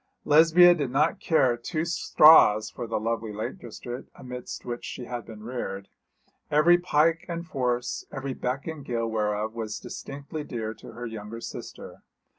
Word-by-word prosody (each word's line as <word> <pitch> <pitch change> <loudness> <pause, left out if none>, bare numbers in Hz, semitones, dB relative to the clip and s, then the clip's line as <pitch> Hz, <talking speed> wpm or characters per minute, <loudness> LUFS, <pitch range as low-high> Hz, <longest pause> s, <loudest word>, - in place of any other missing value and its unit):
Lesbia 165 +4 +7
did 145 -7 -2
not 150 +9 +1
care 130 -8 +3
two 155 +7 -3
straws 130 -10 +6
for 120 - -6
the 115 - -1
lovely 115 0 -2
lake 105 +1 -5
district 120 +2 -8
amidst 125 -1 -8
which 120 -1 -5
she 125 - -6
had 120 -2 -6
been 110 -2 -10
reared, 100 -5 -5 0.6
every 160 +4 +5
pike 165 -1 +2
and 170 0 -4
force, 125 -5 -2
every 135 0 -4
beck 130 +2 -3
and 160 -3 -6
gill 115 -3 -2
whereof 110 -1 -1
was 110 -2 -5
distinctly 145 +2 -7
dear 110 -5 -4
to 115 - -13
her 120 +1 -7
younger 110 0 -7
sister. - - -9
125 Hz, 160 wpm, -26 LUFS, 115-150 Hz, 0.6 s, Lesbia